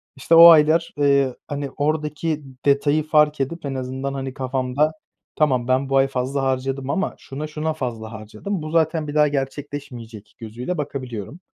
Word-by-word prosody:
İşte, 135 Hz, +5 st, +2 dB
o 165 Hz, +1 st, +11 dB
aylar, 160 Hz, +1 st, +4 dB
eee, 140 Hz, -3 st, +2 dB
hani, 145 Hz, -2 st, -4 dB
oradaki 150 Hz, +1 st, -1 dB, 0.2 s
detayı 145 Hz, +2 st, +3 dB
fark 150 Hz, -1 st, +3 dB
edip 160 Hz, +4 st, -4 dB
en 135 Hz, -1 st, -3 dB
azından, 130 Hz, +1 st, -4 dB
hani, 135 Hz, -1 st, -5 dB
kafamda 130 Hz, +2 st, 0 dB, 0.4 s
"Tamam, 130 Hz, -6 st, +1 dB
ben 130 Hz, +1 st, +1 dB
bu 135 Hz, -, +2 dB
ay 135 Hz, 0 st, +4 dB
fazla 135 Hz, +1 st, -2 dB
harcadım 135 Hz, +1 st, -2 dB
ama 190 Hz, +7 st, -1 dB
şuna, 145 Hz, +3 st, -7 dB
şuna 155 Hz, +1 st, -3 dB
fazla 115 Hz, -7 st, -5 dB
harcadım, 110 Hz, -, -6 dB
bu 155 Hz, 0 st, -6 dB
zaten 160 Hz, -1 st, +1 dB
bir 145 Hz, -, -6 dB
daha 150 Hz, 0 st, +5 dB
gerçekleşmeyecek." 135 Hz, -6 st, -6 dB
gözüyle 120 Hz, +10 st, -5 dB
bakabiliyorum. 135 Hz, -, -6 dB
140 Hz, 160 wpm, -22 LUFS, 130-150 Hz, 0.4 s, o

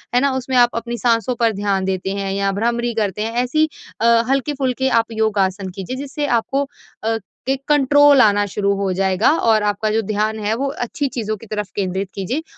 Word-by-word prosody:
है 245 Hz, -, +6 dB
ना? 280 Hz, -1 st, +2 dB
उसमें 260 Hz, 0 st, -3 dB
आप 240 Hz, 0 st, +4 dB
अपनी 235 Hz, +1 st, -3 dB
साँसों 235 Hz, 0 st, +1 dB
पर 230 Hz, -1 st, +3 dB
ध्यान 195 Hz, -1 st, -1 dB
देते 190 Hz, 0 st, -2 dB
हैं 195 Hz, -1 st, -3 dB
या 195 Hz, 0 st, 0 dB
भ्रामरी 235 Hz, +3 st, -1 dB
करते 210 Hz, -2 st, -1 dB
हैं 225 Hz, -, -3 dB
ऐसी 310 Hz, +5 st, +2 dB, 0.3 s
अ, 230 Hz, 0 st, +4 dB
हल्के-फुल्के 265 Hz, -1 st, 0 dB
आप 225 Hz, -, 0 dB
योग-आसन 200 Hz, -3 st, 0 dB
कीजिए। 195 Hz, +7 st, -5 dB
जिससे 285 Hz, +1 st, -4 dB
आपको 270 Hz, +3 st, +1 dB, 0.4 s
अ, 225 Hz, 0 st, 0 dB, 0.3 s
एक 270 Hz, 0 st, 0 dB
कंट्रोल 290 Hz, -1 st, +5 dB
आना 205 Hz, -2 st, +4 dB
शुरू 200 Hz, +1 st, 0 dB
हो 195 Hz, -1 st, -1 dB
जाएगा 190 Hz, +5 st, +2 dB
और 220 Hz, -2 st, +3 dB
आपका 210 Hz, +1 st, 0 dB
जो 225 Hz, -, +1 dB
ध्यान 215 Hz, +1 st, 0 dB
है 215 Hz, -, +1 dB
वो 275 Hz, +3 st, -1 dB, 0.2 s
अच्छी 280 Hz, +4 st, -2 dB
चीज़ों 215 Hz, -4 st, -3 dB
की 230 Hz, -, -13 dB
तरफ़ 210 Hz, -2 st, -4 dB
केंद्रित 190 Hz, 0 st, -2 dB
कीजिए 245 Hz, -, -3 dB
225 Hz, 195 wpm, -19 LUFS, 200-255 Hz, 0.4 s, है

